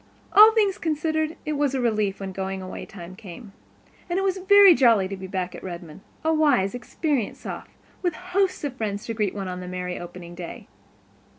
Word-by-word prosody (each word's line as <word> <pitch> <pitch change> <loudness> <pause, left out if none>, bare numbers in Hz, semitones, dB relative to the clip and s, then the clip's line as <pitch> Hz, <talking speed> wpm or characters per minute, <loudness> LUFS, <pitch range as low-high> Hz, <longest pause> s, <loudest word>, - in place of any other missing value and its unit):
All 430 +2 +10
things 415 -4 +2
considered, 315 0 -1
it 305 - -1
was 285 -2 0
a - - 0
relief 215 -5 0
when 195 -1 -5
going 190 0 -4
away 185 0 -7
time 180 -1 -10
came. 195 +1 -11 0.6
And 345 - 0
it 385 - +1
was 385 -1 0
very 400 0 +8
jolly 230 -9 +4
to 195 - -5
be 190 0 -8
back 185 -1 -3
at - - -9
Redmond, 175 -2 -8 0.2
a 320 0 +2
wise, 280 -11 +3
experienced 245 0 -2
Soph - - -7 0.3
with 355 -4 0
hosts 370 0 -1
of 280 -3 -3
friends 205 -4 -3
to 230 - -3
greet 210 -3 -1
on 185 -2 -4
the 180 - -7
merry 180 0 -4
opening 175 0 -9
day. 175 -1 -8
220 Hz, 195 wpm, -24 LUFS, 185-315 Hz, 0.6 s, All